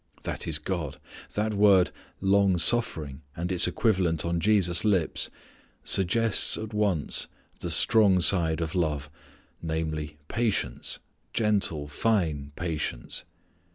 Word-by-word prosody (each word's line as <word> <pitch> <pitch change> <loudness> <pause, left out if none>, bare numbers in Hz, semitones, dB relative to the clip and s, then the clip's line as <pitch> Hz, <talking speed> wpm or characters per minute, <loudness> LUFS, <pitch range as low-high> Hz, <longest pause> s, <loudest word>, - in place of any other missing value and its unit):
That - - -4
is 80 -2 +2
God. 80 -4 -4 0.4
That 105 +1 -1
word 100 -3 +4 0.3
"long 95 -1 +3
suffering" 80 - +1 0.2
and 90 +2 -3
its 90 -1 +3
equivalent 90 -4 +1
on 85 0 -1
Jesus' 90 -3 +2
lips 95 -7 0 0.5
suggests 100 +4 +3
at 110 0 -7
once 100 -8 +1 0.3
the - - -4
strong 100 -4 +5
side 85 -3 +3
of 80 +1 -3
love, 75 -5 -2 0.5
namely, 80 -2 -4
patience, 110 - -1 0.4
gentle, 100 -9 0
fine 75 -5 -1
patience. 80 -7 -3
90 Hz, 115 wpm, -27 LUFS, 80-100 Hz, 0.5 s, strong